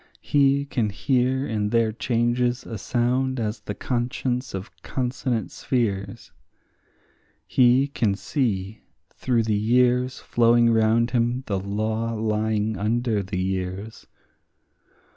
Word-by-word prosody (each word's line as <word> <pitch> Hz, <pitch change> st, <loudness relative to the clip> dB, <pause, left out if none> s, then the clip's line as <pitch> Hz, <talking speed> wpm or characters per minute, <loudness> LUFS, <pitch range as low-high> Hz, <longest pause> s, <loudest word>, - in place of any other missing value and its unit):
He 140 Hz, -1 st, +3 dB
can 120 Hz, -6 st, -1 dB
hear 130 Hz, +5 st, 0 dB
in 105 Hz, -2 st, -1 dB
their 115 Hz, 0 st, +2 dB
changes 120 Hz, +2 st, 0 dB
a 110 Hz, -3 st, -6 dB
sound 125 Hz, +3 st, 0 dB
as 110 Hz, -1 st, -2 dB
the 105 Hz, -1 st, -6 dB
conscience 125 Hz, 0 st, -2 dB
of 95 Hz, +2 st, -6 dB
consonant 125 Hz, -4 st, -2 dB
spheres; 105 Hz, -6 st, -2 dB, 1.1 s
He 125 Hz, +7 st, +4 dB
can 115 Hz, -8 st, 0 dB
see 110 Hz, -5 st, -2 dB, 0.3 s
through 120 Hz, -3 st, 0 dB
the 110 Hz, -1 st, 0 dB
years 125 Hz, +4 st, +2 dB
flowing 120 Hz, 0 st, +3 dB
round 115 Hz, +1 st, +3 dB
him 120 Hz, +1 st, 0 dB
the 100 Hz, -2 st, -1 dB
law 110 Hz, +3 st, -2 dB
lying 110 Hz, -1 st, -1 dB
under 110 Hz, 0 st, 0 dB
the 95 Hz, 0 st, -5 dB
years. 95 Hz, +3 st, -4 dB
115 Hz, 115 wpm, -24 LUFS, 105-125 Hz, 1.1 s, He